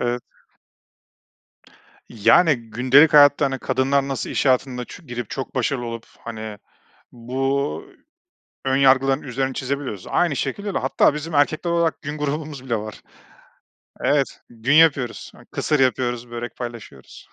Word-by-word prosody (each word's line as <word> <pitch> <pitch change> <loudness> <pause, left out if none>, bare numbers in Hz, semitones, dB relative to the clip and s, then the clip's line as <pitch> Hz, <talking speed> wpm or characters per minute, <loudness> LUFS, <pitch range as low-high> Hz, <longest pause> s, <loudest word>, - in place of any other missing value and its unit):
Evet. 120 0 -1 1.9
Yani, 145 - +4 0.2
gündelik 130 +7 +5
hayatta, 145 0 +6
hani, 135 -1 -1
kadınlar 135 +2 0
nasıl 135 -2 -3
iş - - -1
hayatında 125 -1 +1
ç 190 - -12
girip 120 -2 -6
çok 135 - -5
başarılı 130 0 -1
olup, 115 -1 -7 0.2
hani, 110 -2 -7 0.5
bu 135 +4 -2 0.8
ön 135 0 +2
yargıların 135 0 +4
üzerini 135 0 -3
çizebiliyorsa, 130 -7 -4
aynı 170 -5 +2
şekilde 200 +7 -3
de, - - 0
hatta 135 +2 +2
bizim 155 +2 -6
erkekler 155 +4 +1
olarak 170 -1 0
gün 150 +1 -5
grubumuz 150 -2 -4
bile 120 -3 -1
var. 110 0 -8 1.0
Evet, 140 -1 0
gün 120 +4 -1
yapıyoruz, 145 -7 +3
ı - - -17
kısır 150 - 0
yapıyoruz, 120 -1 0
börek 120 0 -6
paylaşıyoruz. 120 -3 -10
135 Hz, 135 wpm, -22 LUFS, 120-145 Hz, 1.9 s, hayatta